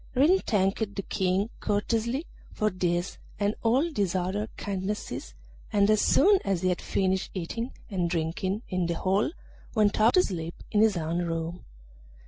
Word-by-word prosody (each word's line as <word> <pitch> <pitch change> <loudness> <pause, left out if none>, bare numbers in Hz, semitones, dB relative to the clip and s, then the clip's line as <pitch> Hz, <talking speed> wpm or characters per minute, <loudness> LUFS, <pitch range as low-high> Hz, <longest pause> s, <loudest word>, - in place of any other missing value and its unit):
Ring 315 +9 +5
thanked 200 - 0
the 195 - -3
King 190 +3 0
courteously 230 +7 0 0.3
for 215 -1 0
this 175 0 -1 0.2
and 205 0 +1
all 240 +5 +3
his 195 -3 0
other 190 +4 -1
kindnesses, 195 - -4 0.4
and 205 +1 +4
as 215 - +4
soon 395 +5 +5
as 190 -3 -1
he 185 - +3
had 180 - -1
finished 190 -1 0
eating 230 +8 -3 0.2
and 180 -4 -1
drinking 180 +5 -1
in 185 -2 -1
the 170 - -1
hall 195 +4 +1 0.5
went 210 -1 +3
off 225 +3 +6
to 365 - +6
sleep 170 -3 -4 0.2
in 210 - +3
his 215 -4 +4
own 165 +1 -1
room. 165 0 -3
195 Hz, 160 wpm, -28 LUFS, 180-215 Hz, 0.5 s, off